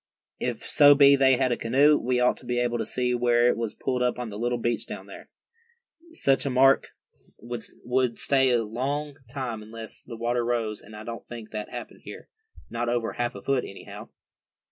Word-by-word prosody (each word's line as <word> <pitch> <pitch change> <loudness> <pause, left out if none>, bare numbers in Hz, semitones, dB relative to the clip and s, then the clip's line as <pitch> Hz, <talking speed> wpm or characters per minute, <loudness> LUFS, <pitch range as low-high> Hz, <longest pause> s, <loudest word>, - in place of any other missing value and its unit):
"If - - -3
so 145 -1 +7
be 140 0 +7
they 135 -2 +4
had 130 -1 +1
a - - +2
canoe, 140 +6 +4
we 125 -2 0
ought 125 0 +3
to - - -14
be 120 0 -1
able 120 -1 0
to 110 - -3
see 125 +1 -1
where 120 0 +3
it - - +2
was 115 -2 -4
pulled 125 -1 -2
up 125 0 +1
on 125 -2 -4
the 105 0 -7
little 120 +1 0
beach 120 -2 -2
down - - -8
here. - - -12 0.8
Such 135 - +2
a 140 - -1
mark 135 +1 +4 0.5
would 120 +1 -3
stay 135 -1 +2
a 120 -2 +2
long 140 +6 -3
time 125 -4 -4
unless 110 +1 -10
the 115 -2 -9
water 120 +1 0
rose, 115 -3 -2
and 110 +1 -13
I 105 - -8
don't 115 +1 -8
think 115 -2 -9
that 105 -1 -5
happened - - -8
here, - - -10 0.4
not 120 0 -3
over 120 -1 -1
half 120 -2 -2
a 100 - -9
foot, 135 -2 +1
anyhow." 100 - -10
120 Hz, 205 wpm, -26 LUFS, 115-130 Hz, 0.8 s, so